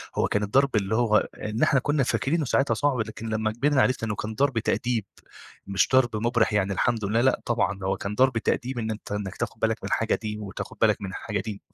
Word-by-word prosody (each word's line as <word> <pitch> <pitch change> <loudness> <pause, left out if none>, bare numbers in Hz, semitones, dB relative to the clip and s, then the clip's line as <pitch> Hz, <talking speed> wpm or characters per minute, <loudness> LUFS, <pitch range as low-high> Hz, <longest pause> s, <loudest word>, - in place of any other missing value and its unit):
هو - - +2
كان 105 - 0
الضرب 135 +5 +2
اللي 100 0 +1
هو 110 -2 +3
إن 110 +4 -2
إحنا 140 -3 +4
كنّا 145 +1 +1
فاكرينه 150 +5 0
ساعتها 135 +2 +2
صعب، 145 -3 0
لكن 110 0 -4
لمّا 110 0 0
كبرنا 135 +4 +2
عرفنا 125 -3 +1
إنّه 105 - -2
كان 110 +2 -5
ضرب 135 -1 +1
تأديب 115 -1 -1 0.6
مش 100 0 +2
ضرب 125 -4 +4
مُبرح 115 +1 +1
يعني 100 -1 +1
الحمد 110 +2 0
لله، 110 +4 +1
لأ 130 +1 +2
طبعًا 110 -4 0
ده 95 - -4
هو 95 - 0
كان 100 +1 -4
ضرب 130 0 +3
تأديب 120 +2 -1
إن 110 -1 -2
أنت 110 -1 -8
إنّك 105 -2 -4
تاخد - - -4
بالك - - +1
من - - -3
الحاجة - - +1
دي 105 -1 -4
وتاخد 100 -2 -7
بالك - - +3
من 100 - -4
الحاجة 105 +2 -4
دي، 105 -3 -6
110 Hz, 230 wpm, -26 LUFS, 105-130 Hz, 0.6 s, إحنا